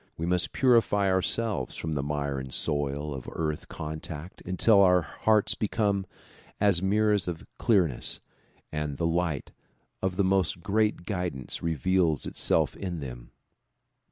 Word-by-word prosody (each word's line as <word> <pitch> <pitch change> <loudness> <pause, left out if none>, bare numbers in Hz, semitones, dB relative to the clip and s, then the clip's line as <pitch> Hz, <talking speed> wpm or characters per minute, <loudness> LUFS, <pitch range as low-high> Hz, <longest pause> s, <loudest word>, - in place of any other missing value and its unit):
We 80 - -2
must 90 0 0
purify 115 -6 +3
ourselves 95 - 0
from 80 - -4
the 75 -3 0
mire 70 -1 -2
and 65 0 -7
soil 75 +1 -1
of 65 -2 -7
earth 75 -2 -3
contact 80 +2 -7
until 100 +3 +4
our 90 -2 +5
hearts 105 +7 +2
become 100 -2 0 0.5
as 100 -4 +4
mirrors 105 -1 +2
in 85 -2 -5
clearness 90 - +2 0.5
and 75 -2 -3
the 85 - -1
light 85 -4 -1 0.5
of 95 -1 -1
the 100 - +2
most 95 -4 +1
great 105 -3 +1
guidance 90 - -4
re 85 -1 -1
veals 85 -1 +1
itself - - +1
in 90 -4 -4
them. - - -8
90 Hz, 140 wpm, -28 LUFS, 75-100 Hz, 0.5 s, our